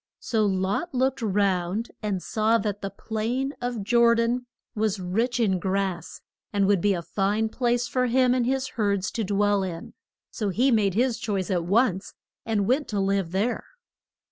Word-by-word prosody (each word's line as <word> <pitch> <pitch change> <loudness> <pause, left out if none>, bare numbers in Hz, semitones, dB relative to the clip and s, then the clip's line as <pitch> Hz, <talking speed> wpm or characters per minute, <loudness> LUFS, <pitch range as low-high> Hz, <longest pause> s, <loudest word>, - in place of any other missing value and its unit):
So 220 -3 +1
Lot 195 - -1
looked 265 +1 +1
round 200 0 0
and 200 -4 -2
saw 220 +1 +2
that 205 -2 -3
the 195 - -3
plain 235 +7 -3
of 245 -4 -3
Jor 235 +2 +4
dan 240 +2 0 0.3
was 215 -3 0
rich 225 +7 -1
in 195 -5 +2
grass, 190 -2 -2 0.3
and 200 -1 +2
would 195 -2 +3
be 205 0 +2
a 170 - -4
fine 200 +5 0
place 240 0 0
for 250 +1 0
him 250 +1 +3
and 250 -2 +1
his 265 0 0
herds 200 -4 -1
to 230 - -2
dwell 205 0 +2
in; 175 -3 -5 0.4
so 210 -4 -2
he 245 +8 +2
made 205 -5 +2
his 245 +1 +1
choice 195 -4 -2
at 175 -3 0
once, 200 0 +1 0.3
and 210 -3 +1
went 270 +5 +1
to 205 - -2
live 195 -3 0
there. 205 +6 -1
210 Hz, 175 wpm, -25 LUFS, 195-240 Hz, 0.4 s, Jor